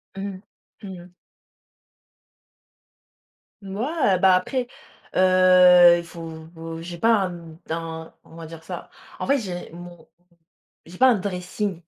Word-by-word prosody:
Mmh, 195 -1 -6 0.4
mmh 200 - -8 0.2
mh. 180 - -20 2.5
Ouais, 205 - -1
bah, 190 0 +5
après, 245 +6 -2 0.5
heu, 185 -1 +6
il 170 - -7
faut 170 -1 -10 0.3
vou 165 0 -8
j'ai 175 0 -8
pas 225 +6 +3
un, 180 - -7
hem, 165 -1 -12
un, 160 0 -6
on - - -17
va 165 -1 -9
dire 160 0 -11
ça. - - -8 0.3
En - - -4
fait, 280 0 +2
j'ai 180 -6 -6
mon 175 -1 -12 0.8
j'ai 175 +2 -13
pas 260 - +6
un 245 - +4
dressing. 185 0 -4
180 Hz, 135 wpm, -23 LUFS, 170-195 Hz, 2.5 s, heu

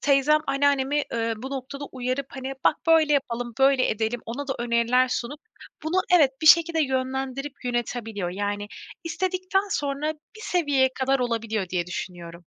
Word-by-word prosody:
teyzem 285 +2 +4
anneannemi, 280 +1 +2
ııı, 230 0 0
bu 265 - -5
noktada 275 +1 -5
uyarıp, 255 +1 -2
hani: 265 0 -5
"Bak - - +4
böyle 320 -2 +5
yapalım, 245 -4 -1
böyle 270 -1 +4
edelim." 220 +2 -1
ona 270 +5 -5
da 270 - 0
öneriler 240 +2 +2
sunup 255 +4 -3 0.4
bunu 315 +4 -1 0.2
evet, 295 -6 +5
bir - - 0
şekilde 335 0 +6
yönlendirip 265 +1 -3
yönetebiliyor, 230 -6 -2
yani, 205 +2 -3 0.4
istedikten 370 +3 -1
sonra 290 0 -1
bir 315 +8 -18
seviyeye 290 -9 +2
kadar 270 +1 +2
olabiliyor 225 -5 -1
diye 175 -1 -1
düşünüyorum. 175 -1 -6
265 Hz, 150 wpm, -25 LUFS, 235-290 Hz, 0.4 s, şekilde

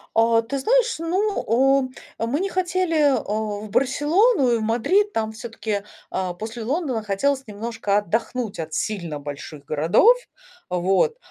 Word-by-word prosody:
О, 230 0 +4
ты 270 +4 -4
знаешь, - - +2
ну, 370 +6 -1
у 265 +3 +3 0.4
мы 265 +6 -1
не 390 - 0
хотели 365 -2 0
а, 285 -3 +3 0.4
в - - -10
Барселону 290 - +3
и - - +3
в - - -4
Мадрид, 290 - +2
там 220 - -2
всё-таки, 220 -3 -4 0.3
а, 185 -1 -2
после 220 +5 -6
Лондона 260 -3 -1
хотелось 265 +7 0
немножко 210 -1 -2
отдохнуть 225 +3 -2
от 160 -1 -5
сильно 175 -8 -3
больших 145 0 -8
городов, 165 - +4 0.5
вот. 190 - +1
235 Hz, 145 wpm, -23 LUFS, 205-310 Hz, 0.5 s, О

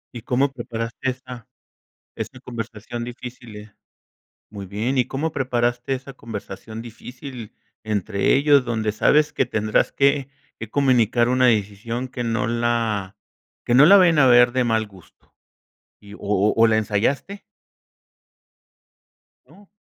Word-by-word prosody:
¿Y 120 - -6
cómo 135 +4 0
preparaste 115 +1 -4
esa 125 -2 -8 0.7
esa 130 - -7
conversación 120 -1 -6
difícil? 120 -4 -10 0.8
Muy 100 -2 -8
bien, 110 +7 -2
¿y 125 - +2
cómo 150 +4 -3
preparaste 120 -1 -1
esa 135 +1 -8
conversación 110 -1 -8
difícil 125 0 -10 0.3
entre 105 -2 0
ellos, 140 -1 +4
donde 110 -3 -1
sabes 150 +7 +3
que - - +1
tendrás 110 -3 0
que 140 -1 +1 0.3
que 115 - -7
comunicar 120 -4 +2
una 125 0 +3
decisión 115 +2 -1
que 125 -1 -5
no 115 -2 -1
la 115 -4 -1 0.5
que 120 - +2
no 140 +4 +8
la 200 - +8
vayan 170 -5 +5
a 135 - +6
ver 120 0 +6
de 130 0 +1
mal 110 -2 0
gusto? 95 -4 -21 0.7
Y, 100 0 -12
¿o - - -16
o 105 +1 +1
o, 115 - +5
la 110 - +2
ensayaste? 115 - -1 2.1
No. 195 +5 -19
120 Hz, 135 wpm, -22 LUFS, 110-130 Hz, 2.1 s, no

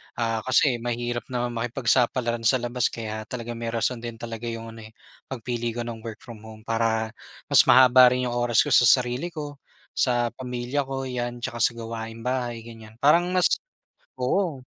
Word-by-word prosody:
Ah, 115 -1 -1
kasi 125 -1 +3
mahirap 120 0 -3
naman 120 -1 -2
makipagsapalaran 120 0 0
sa 130 - +5
labas 120 0 0
kaya 110 -1 -6
talagang 120 -1 -6
may 115 - -4
rason 115 +1 -1
din 115 0 -6
talaga 115 0 -7
yung 115 0 -6
ano, 115 - -12
eh, 110 - -20 0.3
pagpili 120 -2 -4
ko 120 - -3
ng 115 -1 -6
work 110 -1 -9
from 115 -3 -11
home 110 0 -13
para 115 -1 0 0.4
mas - - +7
mahaba 125 -1 +7
rin 125 -1 -1
yung - - -3
oras 120 -2 +3
ko - - -4
sa 120 - +6
sarili 125 +5 +3
ko, 150 -4 -7 0.3
sa 120 -2 +1
pamilya 125 +2 -3
ko, 135 0 -4
'yan. 120 -1 -4
Tsaka 120 - -4
sa 120 0 +2
gawaing 115 0 -7
bahay, 120 -2 -2
ganiyan. 110 -2 -12
Parang 170 +5 +5
mas 180 - +5 0.7
oo. 135 +2 -1
120 Hz, 180 wpm, -25 LUFS, 115-125 Hz, 0.7 s, mas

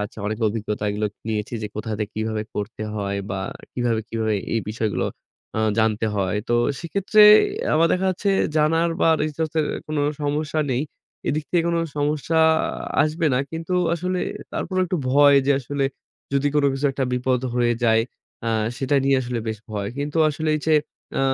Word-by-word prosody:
যাচ্ছে 105 +1 -5
অনেক 105 +1 -2
অভিজ্ঞতাগুলো 105 -1 -1 0.2
নিয়েছি 110 +1 -2
যে - - -2
কোথা 105 +1 -4
থেকে 105 -1 -3
কিভাবে 110 0 -1
করতে 105 +2 -4
হয় 100 -1 -2
বা 95 - -2 0.3
কিভাবে, 120 -3 0
কিভাবে 110 -1 -1 0.2
এই 115 - +2
বিষয়গুলো 110 -1 -1 0.5
আ - - 0 0.2
জানতে 110 0 +2
হয়। 95 0 0
তো 120 - +2 0.2
সেক্ষেত্রে 200 +5 +3 0.5
আমার 165 +2 +5
দেখা 190 +1 +1
যাচ্ছে 190 +2 -1 0.3
জানার 165 +2 +3
বা - - +4
resource 155 +1 -2
এর - - +1 0.2
কোনো 155 -1 -1 0.2
সমস্যা 150 +2 -1
নেই। 125 +2 0 0.5
এদিক 155 +1 0
থেকে 175 -2 +3
কোনো 170 0 +1 0.2
সমস্যা 150 +2 0 0.6
আসবে 160 +2 0
না। - - +2
কিন্তু 165 +2 -3 0.2
আসলে 180 +2 -2 0.3
তারপরও 185 -1 -1
একটু 180 - -1
ভয় 145 +1 +6
যে 140 - +5
আসলে 140 +2 -2 0.5
যদি 140 +1 +2
কোনো 145 -1 +4
কিছু 135 +2 0
একটা 135 0 -1
বিপদ 125 0 +1
হয়ে 120 -1 +2
যায়, 110 -1 +4 0.4
এ - - +1 0.3
সেটা 135 +1 +1
নিয়ে 135 0 +4
আসলে 120 -1 -3
বেশ 110 -1 -3
ভয়। 100 -2 -3
কিন্তু 145 +3 -2
আসলে 155 +1 -2
এই - - -5
যে 160 - +4 0.4
এ - - +2
135 Hz, 170 wpm, -23 LUFS, 110-155 Hz, 0.6 s, ভয়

